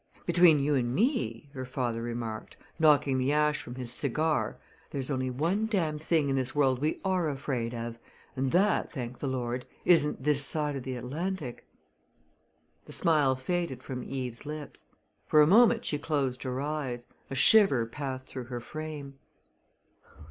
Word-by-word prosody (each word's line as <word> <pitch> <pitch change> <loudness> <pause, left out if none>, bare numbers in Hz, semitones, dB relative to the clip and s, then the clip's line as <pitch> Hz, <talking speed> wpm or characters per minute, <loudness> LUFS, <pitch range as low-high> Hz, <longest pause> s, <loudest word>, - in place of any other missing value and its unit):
"Between 175 -2 +6
you 145 +1 +1
and 125 -2 0
me," 145 - 0
her 130 -2 -5
father 125 -3 -2
remarked, 115 -2 -5 0.2
knocking 145 -4 +4
the 130 +2 +1
ash 150 0 +2
from 120 - -9
his 125 -2 -3
cigar, 145 - 0 0.3
"there's 135 0 -3
only 130 -1 -1
one 170 - 0
darned 160 -8 -1
thing 160 -2 +1
in 135 - 0
this 130 0 0
world 135 -3 +3
we 150 +3 -1
are 185 -4 +1
afraid 130 -4 -3
of 115 0 -5 0.4
and 130 0 -1
that, 200 +4 +2
thank 125 -4 -6
the 140 - -3
Lord, 125 -1 -3 0.2
isn't 150 -6 +3
this 145 -1 +3
side 150 0 +1
of 135 - -4
the 130 0 -5
Atlantic!" 145 +3 -5 1.2
The - - -10
smile 150 -5 +3
faded 135 -1 -3
from 130 -2 -5
Eve's 125 -3 -5
lips. 150 0 -8 0.4
For 155 - +4
a 150 - +8
moment 230 +6 +5
she 150 - -1
closed 140 -5 -1
her 130 -1 -3
eyes 140 -4 -3 0.2
a 135 - -4
shiver 140 - +6
passed 130 +2 -5
through 130 -2 -7
her 120 0 -5
frame. 145 0 -7
140 Hz, 165 wpm, -29 LUFS, 125-155 Hz, 1.2 s, a